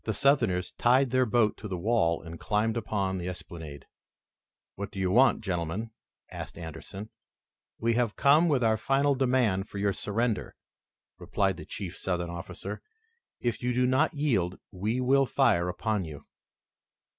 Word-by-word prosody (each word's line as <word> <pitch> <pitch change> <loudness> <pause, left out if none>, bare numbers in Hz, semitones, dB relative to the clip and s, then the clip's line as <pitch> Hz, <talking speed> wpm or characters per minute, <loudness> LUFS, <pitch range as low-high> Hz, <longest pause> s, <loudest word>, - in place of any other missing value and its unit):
The 110 - -2
Southerners 115 -9 +2
tied 125 +1 +4
their 130 -1 +3
boat 110 -1 +2
to 105 - -7
the 95 -3 -3
wall 90 -4 +1
and 85 0 -9
climbed 110 +1 0
upon 100 -4 -1
the 90 - -4
esplanade. 80 -5 -9 0.9
"What 100 +1 -5
do - - -12
you 95 -1 +1
want, 125 +4 +5
gentlemen?" 90 +3 -3 0.4
asked - - -7
Anderson. 85 +6 -8 0.7
"We 115 +1 +1
have 115 -2 0
come 145 +6 +5
with 140 -6 +2
our 110 -1 +3
final 140 +5 +2
demand 125 -7 +1
for - - -7
your 100 0 +1
surrender," 110 +3 -1 0.6
replied 95 -4 0
the - - -9
chief 95 -4 -6
Southern 90 -2 -2
officer. 85 -1 -7 0.6
"If 120 -3 -1
you 125 0 0
do 125 0 +3
not 145 +7 +2
yield 110 - 0
we 105 +7 -2 0.3
fire 85 -5 +2
upon 105 +2 -1
you." 75 -2 -9
105 Hz, 155 wpm, -28 LUFS, 90-125 Hz, 0.9 s, want